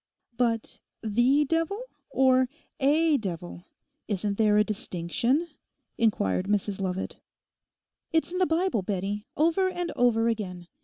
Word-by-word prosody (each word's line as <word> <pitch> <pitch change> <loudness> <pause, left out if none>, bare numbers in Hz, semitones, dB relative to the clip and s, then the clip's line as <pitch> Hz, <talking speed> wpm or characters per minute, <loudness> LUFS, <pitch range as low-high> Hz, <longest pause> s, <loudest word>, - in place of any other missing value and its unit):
'But 230 -2 -1 0.2
the 240 +7 +3
devil, 330 +7 0 0.3
or 260 -1 +3 0.3
a 300 +2 +4
devil? 175 -3 -6 0.4
Isn't 205 0 -2
there 210 -1 +4
a 210 - +6
distinction?' 225 - -1 0.5
inquired 190 - +1
Mrs 205 -1 0
Lovat. 190 0 -3 0.9
'It's 320 +1 +1
in 365 - -2
the 370 - +3
Bible, 330 - +1
Bettie, 200 +3 -3
over 335 +5 +3
and 355 -2 -3
over 230 -2 +3
again. 190 -6 -3
230 Hz, 120 wpm, -27 LUFS, 200-300 Hz, 0.9 s, a